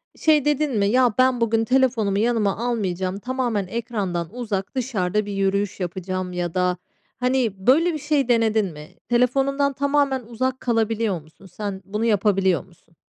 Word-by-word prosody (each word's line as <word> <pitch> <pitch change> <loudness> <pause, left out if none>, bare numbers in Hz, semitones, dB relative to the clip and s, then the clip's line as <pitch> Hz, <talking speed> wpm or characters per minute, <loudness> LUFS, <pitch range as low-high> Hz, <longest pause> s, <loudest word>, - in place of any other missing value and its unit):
şey 305 -3 +3
dedin 295 -4 +1
mi, 200 - +2
"Ya, 250 +1 +3
ben 255 -2 +3
bugün 225 0 +2
telefonumu 235 -6 +2
yanıma 220 -4 +1
almayacağım, 195 -5 -2
tamamen 245 -5 -2
ekrandan 205 -7 -3
uzak, 215 -4 -4
dışarıda 210 -6 -1
bir 205 - -5
yürüyüş 195 0 0
yapacağım." 185 +1 -4
ya 175 -1 -3
da, 180 -1 +1 0.4
hani, 250 -6 0
böyle 330 +6 +5
bir 305 - -3
şey 290 -2 +1
denedin 225 -3 +2
mi? 150 +1 -11 0.2
Telefonundan 275 +3 +2
tamamen 280 -2 +1
uzak 255 +3 -2
kalabiliyor 225 -6 0
musun? 155 +5 -20
Sen 195 +1 -6
bunu 210 +3 -2
yapabiliyor 195 -4 +2
musun? 170 -2 -26
225 Hz, 150 wpm, -23 LUFS, 195-255 Hz, 0.4 s, böyle